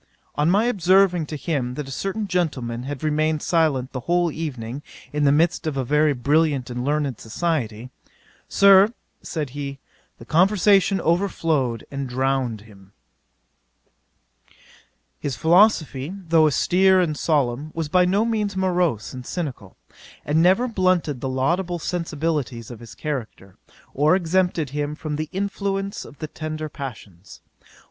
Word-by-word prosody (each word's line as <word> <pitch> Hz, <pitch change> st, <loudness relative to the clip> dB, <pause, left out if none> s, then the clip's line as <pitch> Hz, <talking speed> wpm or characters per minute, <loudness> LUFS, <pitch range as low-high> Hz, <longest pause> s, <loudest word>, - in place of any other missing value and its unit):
On 150 Hz, +2 st, +1 dB
my 205 Hz, +5 st, +3 dB
observing 185 Hz, -5 st, +3 dB
to 155 Hz, -, -5 dB
him 140 Hz, -5 st, -2 dB
that 150 Hz, -1 st, -5 dB
a -, -, -8 dB
certain 195 Hz, -, -3 dB
gentleman 130 Hz, -10 st, -2 dB
had 145 Hz, 0 st, -6 dB
remained 155 Hz, 0 st, 0 dB
silent 150 Hz, -6 st, +1 dB
the 130 Hz, -, -4 dB
whole 175 Hz, +5 st, +1 dB
evening, 135 Hz, -5 st, -5 dB, 0.3 s
in 150 Hz, -1 st, +1 dB
the 140 Hz, -, +5 dB
midst 160 Hz, +2 st, +1 dB
of 145 Hz, -3 st, -2 dB
a 130 Hz, -, -1 dB
very 150 Hz, +3 st, +3 dB
brilliant 140 Hz, 0 st, +1 dB
and 125 Hz, 0 st, -4 dB
learned 145 Hz, -3 st, -1 dB
society, 125 Hz, -3 st, -3 dB, 0.6 s
"Sir, 200 Hz, +1 st, +6 dB, 0.3 s
(said 150 Hz, -6 st, -4 dB
he,) 140 Hz, 0 st, -5 dB, 0.4 s
the -, -, -13 dB
conversation 195 Hz, +2 st, +3 dB
overflowed, 160 Hz, -, 0 dB
and 140 Hz, -2 st, -4 dB
drowned 130 Hz, -3 st, -1 dB
him." 100 Hz, -2 st, -18 dB, 2.3 s
'His 140 Hz, -3 st, -3 dB
philosophy, 160 Hz, -, +3 dB, 0.2 s
though 160 Hz, -1 st, +5 dB
austere 185 Hz, +5 st, +3 dB
and 165 Hz, -4 st, +1 dB
solemn, 145 Hz, -2 st, 0 dB
was 165 Hz, -2 st, -2 dB
by 180 Hz, +4 st, +3 dB
no 195 Hz, +5 st, +2 dB
means 210 Hz, -4 st, -1 dB
morose 180 Hz, -, 0 dB
and 130 Hz, -1 st, -7 dB
cynical, 130 Hz, -, -6 dB, 0.5 s
and 155 Hz, +2 st, +2 dB
never 190 Hz, +8 st, +4 dB
blunted 185 Hz, -, 0 dB
the 135 Hz, -, -2 dB
laudable 170 Hz, +8 st, 0 dB
sensibilities 155 Hz, -8 st, -3 dB
of 120 Hz, -, -9 dB
his 115 Hz, -2 st, -12 dB
character, 115 Hz, -10 st, -6 dB, 0.4 s
or 150 Hz, +5 st, +3 dB
exempted 175 Hz, -4 st, 0 dB
him 150 Hz, +1 st, -3 dB
from 155 Hz, -1 st, -4 dB
the 155 Hz, +1 st, -4 dB
influence 195 Hz, 0 st, -3 dB
of 145 Hz, -, -14 dB
the 155 Hz, -, -5 dB
tender 155 Hz, 0 st, -5 dB
passions. 105 Hz, -, -9 dB
155 Hz, 140 wpm, -23 LUFS, 130-180 Hz, 2.3 s, Sir